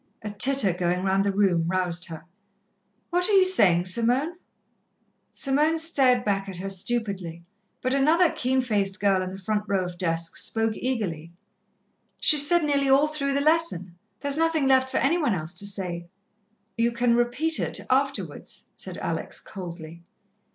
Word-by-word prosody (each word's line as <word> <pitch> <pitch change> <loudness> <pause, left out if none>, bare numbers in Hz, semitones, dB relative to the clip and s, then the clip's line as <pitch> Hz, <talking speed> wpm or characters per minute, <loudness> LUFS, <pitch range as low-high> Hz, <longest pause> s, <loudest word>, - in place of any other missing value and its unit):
A 210 - -5
titter 215 -2 +2
going 180 +1 -2
round 195 0 +1
the 200 - 0
room 190 -5 +1
roused 180 -1 -1
her. 160 0 -9 0.9
"What 360 +2 +2
are - - +1
you 385 -1 +6
saying, 185 - +3
Simone?" 245 - +1 1.0
Simone 300 +4 +1
stared 270 -7 +2
back 195 -1 -1
at 190 - -7
her 195 +2 -5
stupidly, 190 -5 -3 0.4
but 255 +1 0
another 315 +5 +3
keen 260 +1 0
faced 205 -5 -1
girl 195 -2 +2
in 185 0 -5
the 190 - -8
front 210 +2 -3
row 195 -2 0
of 175 -1 -8
desks 165 -2 -1
spoke 225 -1 0
eagerly: 180 -11 -4 0.9
"She's 290 -1 +7
said 345 +1 +3
nearly 280 -2 +1
all 275 +2 +5
through 285 -2 -2
the 280 - +1
lesson, 300 - 0 0.3
there's 285 0 -1
nothing 325 -3 +1
left 260 -1 +3
for 260 - -2
any 325 +6 +1
one 280 - 0
else 160 0 -4
to 200 +3 0
say." 180 -4 -3 0.7
"You 235 +1 +1
can 235 0 +1
repeat 245 +7 +1
it - - 0
afterwards," 275 +1 -2
said - - -8
Alex - - -4
coldly. 170 -3 -10
225 Hz, 165 wpm, -25 LUFS, 185-275 Hz, 1.0 s, She's